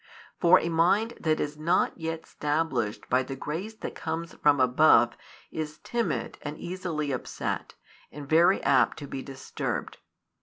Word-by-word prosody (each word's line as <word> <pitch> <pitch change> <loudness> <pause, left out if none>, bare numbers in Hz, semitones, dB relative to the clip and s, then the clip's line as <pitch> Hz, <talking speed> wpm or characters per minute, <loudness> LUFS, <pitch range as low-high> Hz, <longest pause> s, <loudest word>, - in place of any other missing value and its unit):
For 180 +1 +6
a - - -3
mind 185 +8 +2
that 155 -1 +1
is 150 0 -3
not 165 +3 +2
yet 165 -1 -5
stablished 145 -8 -2
by 130 +1 +3
the 135 +1 -5
grace 170 +11 -5
that - - -6
comes 165 +1 -4
from 145 -1 +3
above 125 -2 +5 0.4
is 155 -1 -5
timid 180 - -2
and 150 +1 -6
easily 170 -5 -3
upset, 130 - -4 0.4
and 145 -1 -9
very 170 +5 +4
apt 130 -2 +3
to 145 - -7
be 135 - -5
disturbed. 135 0 -5
155 Hz, 150 wpm, -27 LUFS, 140-170 Hz, 0.4 s, For